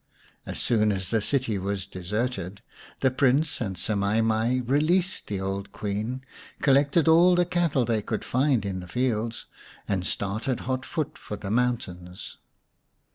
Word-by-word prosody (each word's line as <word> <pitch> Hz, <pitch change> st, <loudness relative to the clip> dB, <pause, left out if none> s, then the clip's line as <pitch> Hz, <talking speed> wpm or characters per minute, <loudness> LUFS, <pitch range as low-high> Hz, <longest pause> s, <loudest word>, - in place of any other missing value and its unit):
As -, -, -4 dB
soon 110 Hz, -3 st, +2 dB
as 95 Hz, -3 st, -3 dB
the 110 Hz, -2 st, +2 dB
city 120 Hz, -4 st, 0 dB
was 95 Hz, -1 st, -2 dB
deserted 100 Hz, +1 st, -3 dB, 0.4 s
the 130 Hz, -, +4 dB
Prince 135 Hz, +4 st, +2 dB
and 95 Hz, -5 st, -2 dB
Semai 100 Hz, +3 st, +1 dB
mai 115 Hz, +3 st, +2 dB
released 170 Hz, +8 st, +1 dB
the 100 Hz, -2 st, -2 dB
old 100 Hz, +1 st, -3 dB
Queen, 110 Hz, +7 st, -3 dB, 0.3 s
collected 140 Hz, +3 st, +3 dB
all 170 Hz, +3 st, +6 dB
the 175 Hz, 0 st, +3 dB
cattle 170 Hz, -7 st, +1 dB
they 115 Hz, -2 st, +1 dB
could 110 Hz, +1 st, -3 dB
find 130 Hz, -4 st, +2 dB
in 95 Hz, -2 st, -3 dB
the 90 Hz, -, -8 dB
fields, 115 Hz, +1 st, -1 dB, 0.4 s
and 95 Hz, -3 st, 0 dB
started 105 Hz, +7 st, -2 dB
hot 130 Hz, 0 st, -2 dB
foot 155 Hz, -4 st, -3 dB
for 105 Hz, -, -6 dB
the 100 Hz, -1 st, -5 dB
mountains. 95 Hz, -7 st, -2 dB
115 Hz, 150 wpm, -26 LUFS, 100-135 Hz, 0.4 s, all